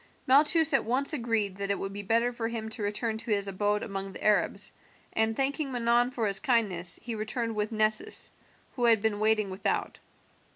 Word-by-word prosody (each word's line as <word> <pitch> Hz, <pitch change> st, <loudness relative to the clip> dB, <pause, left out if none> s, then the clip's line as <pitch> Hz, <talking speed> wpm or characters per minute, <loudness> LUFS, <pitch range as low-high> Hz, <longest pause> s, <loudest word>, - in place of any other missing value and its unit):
Malchus 305 Hz, +4 st, +4 dB
at 270 Hz, -, +2 dB
once 270 Hz, +6 st, +4 dB
agreed 225 Hz, -7 st, -1 dB
that 200 Hz, 0 st, -4 dB
it 200 Hz, -, 0 dB
would 195 Hz, 0 st, -6 dB
be 205 Hz, -, -5 dB
better 230 Hz, +4 st, 0 dB
for 235 Hz, -2 st, -4 dB
him 225 Hz, -1 st, -5 dB
to 220 Hz, 0 st, -7 dB
return 220 Hz, +2 st, -3 dB
to 230 Hz, -, -8 dB
his 200 Hz, -2 st, +1 dB
abode 205 Hz, +2 st, -1 dB
among 195 Hz, -1 st, -6 dB
the -, -, -10 dB
Arabs, 210 Hz, -1 st, +1 dB, 0.4 s
and 220 Hz, 0 st, +1 dB
thanking 275 Hz, +1 st, -1 dB
Manon 240 Hz, 0 st, +1 dB
for 240 Hz, -3 st, -3 dB
his 200 Hz, -2 st, +5 dB
kindness 190 Hz, -8 st, +2 dB
he 235 Hz, -, -5 dB
returned 225 Hz, +2 st, -2 dB
with 210 Hz, 0 st, -3 dB
Nessus, 220 Hz, -, +2 dB, 0.4 s
who 245 Hz, -, -2 dB
had 230 Hz, -2 st, +4 dB
been 210 Hz, -1 st, -2 dB
waiting 215 Hz, -2 st, +1 dB
without. 185 Hz, -, -3 dB
220 Hz, 195 wpm, -28 LUFS, 205-240 Hz, 0.4 s, his